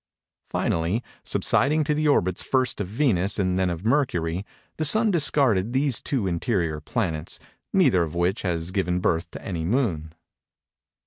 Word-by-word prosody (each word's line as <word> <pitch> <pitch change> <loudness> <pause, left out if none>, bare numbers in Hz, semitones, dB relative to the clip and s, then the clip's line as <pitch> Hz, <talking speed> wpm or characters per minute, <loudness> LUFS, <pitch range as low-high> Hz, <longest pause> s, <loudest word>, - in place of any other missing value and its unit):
Finally, 85 +9 -1 0.2
subsiding 155 +3 +2
to 150 +1 0
the 155 +1 0
orbits 95 -11 +2
first 130 -5 0
of 100 - -3
Venus 105 -4 +1
and 95 -2 0
then 95 -1 +1
of 85 +3 -5
Mercury, 95 - 0 0.3
the 155 - -1
Sun 215 +7 +4
discarded 130 - +2
these 135 -3 +1
two 130 -8 -1
interior 85 -3 -1
planets; 80 -3 -3 0.3
neither 90 - +4
of 85 0 -3
which 90 +4 0
has 85 -2 -2
given 90 -2 0
birth 85 -1 0
to - - -9
any 85 -4 -3
moon. 85 - -1
95 Hz, 150 wpm, -24 LUFS, 85-130 Hz, 0.3 s, Sun